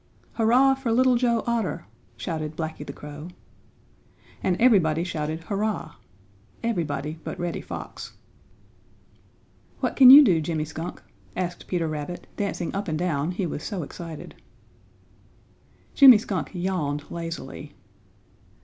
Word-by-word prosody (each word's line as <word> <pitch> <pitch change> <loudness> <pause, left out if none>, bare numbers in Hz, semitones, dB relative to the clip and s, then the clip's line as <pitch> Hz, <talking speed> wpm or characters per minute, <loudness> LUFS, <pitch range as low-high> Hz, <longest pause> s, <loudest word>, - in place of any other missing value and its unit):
"Hurrah 245 +4 +4
for 265 -3 -3
Little 255 +2 +4
Joe 235 -2 +1
Otter!" 230 - -2 0.3
shouted 155 -2 -4
Blacky 160 -2 -4
the - - -7
Crow. 150 +2 -9 1.1
And 180 -1 0
everybody 170 -10 +4
shouted 160 -2 -3
"Hurrah!" 200 -3 -2 0.7
Everybody 155 -8 -2
but - - -6
Reddy 175 -1 -3
Fox. - - -8 1.7
"What - - -1
can 260 -2 +9
you 285 +3 +12
do, 180 - +3
Jimmy 155 -1 -2
Skunk?" 160 +2 -7 0.3
asked 180 -1 -4
Peter 170 -3 -1
Rabbit, 155 +3 -5
dancing 200 -4 -3
up 200 +1 -3
and 155 -2 -1
down, 160 -3 -1
he 185 +1 -2
was 155 - -4
so 190 -1 -4
excited. 165 +1 -9 1.6
Jimmy 265 -5 +9
Skunk 205 -3 -3
yawned 170 -6 -2
lazily. 165 0 -7
175 Hz, 120 wpm, -25 LUFS, 155-220 Hz, 1.7 s, you